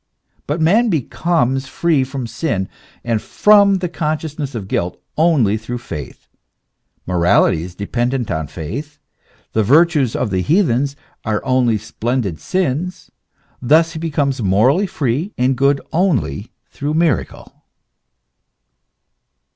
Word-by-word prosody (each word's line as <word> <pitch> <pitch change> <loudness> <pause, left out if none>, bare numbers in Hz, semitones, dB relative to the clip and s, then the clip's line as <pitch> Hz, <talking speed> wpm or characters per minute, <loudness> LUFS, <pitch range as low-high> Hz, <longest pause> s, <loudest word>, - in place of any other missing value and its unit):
But 150 +4 -1
man 210 +9 +3
becomes 140 - 0
free 155 -1 +1
from 130 -1 -5
sin 115 - -2 0.4
and 115 -2 -1
from 205 -1 +4
the 185 -1 -2
consciousness 155 -4 -3
of 100 -4 -5
guilt 90 -1 -2 0.2
only 145 -11 +3
through 115 +3 -5
faith, 85 - -8 0.8
morality 90 -2 +3
is 90 +1 -8
depen 120 +5 -1
dent 125 -3 -2
on 80 -3 -2
faith, 130 - -6 0.6
the 110 - +2
virtues 145 - +3
of 115 - -1
the 95 -1 0
heathens 140 - +1 0.3
are 110 +2 -2
only 130 -4 +2
splendid 110 - -3
sins; 180 - -2 0.5
thus 160 +6 +4
he 160 - -5
becomes 145 -5 -1
morally 115 - +3
free 150 - -2
and 130 +2 +2
good 140 +2 +2
only 140 - 0 0.2
through 145 +2 -3
miracle. 165 -4 -1
135 Hz, 125 wpm, -18 LUFS, 110-160 Hz, 0.8 s, from